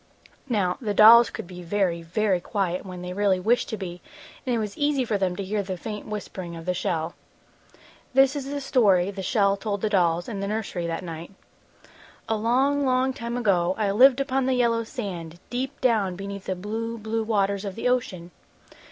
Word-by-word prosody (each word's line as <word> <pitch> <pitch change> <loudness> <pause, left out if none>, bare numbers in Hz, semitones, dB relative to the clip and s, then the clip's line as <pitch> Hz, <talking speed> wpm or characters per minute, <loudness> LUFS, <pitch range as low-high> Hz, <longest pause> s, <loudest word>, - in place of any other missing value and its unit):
Now 190 -6 0
the 210 -4 -2
dolls 230 +3 +9
could - - -7
be 180 0 -10
very, 175 -1 0
very 185 +3 0
quiet 185 -3 -2
when 180 -1 -7
they 180 0 -5
really 195 -1 +2
wished 225 +6 +1
to 220 - -3
be, 180 -3 -7 0.4
and 250 -3 0
it - - +1
was 210 -2 -3
easy 290 -3 +1
for 220 - -1
them 185 -2 0
to 200 - -4
hear 205 +2 -1
the 190 -2 -5
faint 210 +4 -6
whispering 190 -4 -6
of 165 0 -9
the 180 - 0
shell. 170 -2 -2 1.0
This 270 +1 +5
is 275 -1 -4
the 285 0 -3
story 200 -9 +3
the 195 -1 -6
shell 200 +1 +2
told 200 0 -3
the 215 - -1
dolls 175 -3 +2
in 210 -4 -5
the 200 - -2
nursery 200 -5 -3
that 165 +2 -3
night: 170 +2 -7 0.9
"A 225 - +1
long, 260 +6 +2
long 260 0 +2
time 235 0 -4
ago, 185 -6 +2
I 205 -2 +1
lived 255 +5 +6
upon 270 -1 0
the 260 - +2
yellow 230 -2 +2
sand, 180 - -6
deep 255 +2 -3
down 215 -7 +2
beneath 200 +1 -7
the 185 - -2
blue, 225 +5 -4
blue 225 +1 -2
waters 200 -2 0
of 195 -2 -5
the 230 - -2
ocean. 185 -9 -1
205 Hz, 200 wpm, -25 LUFS, 185-235 Hz, 1.0 s, dolls